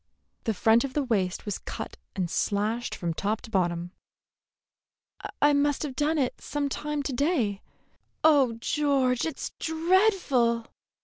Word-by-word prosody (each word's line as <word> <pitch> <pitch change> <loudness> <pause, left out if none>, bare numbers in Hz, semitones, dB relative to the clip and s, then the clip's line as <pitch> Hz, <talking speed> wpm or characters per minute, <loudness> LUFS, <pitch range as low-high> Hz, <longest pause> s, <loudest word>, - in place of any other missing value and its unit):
The 225 - 0
front 225 +4 +4
of 275 -2 -4
the 295 - +1
waist 195 -8 -1
was 205 - -3
cut - - -6 0.2
and 185 -2 -1
slashed 210 +6 -1
from 170 -2 -2
top 210 +6 -1
to 225 - -12
bottom. 175 -3 0 1.5
"I 290 0 +5
must 285 0 +2
have 280 -4 -4
done 300 +4 +1
it 260 -4 -1
some 290 -1 -2
time 300 +1 -3
to 275 - -3
day. 245 - 0 0.6
Oh, 285 -6 +5
George, 260 +1 +1
it's 320 - -5
dreadful!" 320 - +2
255 Hz, 140 wpm, -27 LUFS, 215-295 Hz, 1.5 s, I